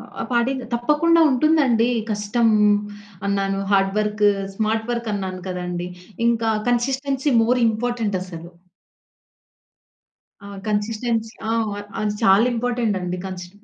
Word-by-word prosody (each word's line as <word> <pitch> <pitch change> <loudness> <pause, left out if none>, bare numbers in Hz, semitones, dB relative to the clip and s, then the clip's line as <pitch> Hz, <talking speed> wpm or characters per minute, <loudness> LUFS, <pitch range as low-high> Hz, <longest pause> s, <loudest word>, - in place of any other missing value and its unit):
ఆహ్, - - -4
పాటిద్దా 250 +1 0
తప్పకుండా 300 +8 +3
ఉంటుందండి 260 -4 +3 0.2
కష్టం 215 +3 +1 0.8
అన్నాను, 195 0 0
హార్డ్ 195 -1 +3
వర్క్, 210 0 0 0.3
స్మార్ట్ 220 +2 -1
వర్కన్నాను 205 -6 -3
కదండి. 180 -1 -4 0.4
ఇంకా 230 -1 +1 0.2
కన్సిస్టెన్సీ 265 +3 0
మోర్ 250 +2 +2
ఇంపార్టెంట్ 225 -2 -1
అసలు. 170 -2 -9 1.9
ఆ 200 - -9 0.2
కన్సిస్టెన్సీ 220 +2 -1 0.2
ఆ! - - +1 0.2
అ - - -5 0.2
అది 210 -1 0
చాలా 200 +2 +5
ఇంపార్టెంట్ 235 -3 -1
అండి 180 0 -3
కన్సీ 180 -2 -7
225 Hz, 110 wpm, -22 LUFS, 195-245 Hz, 1.9 s, చాలా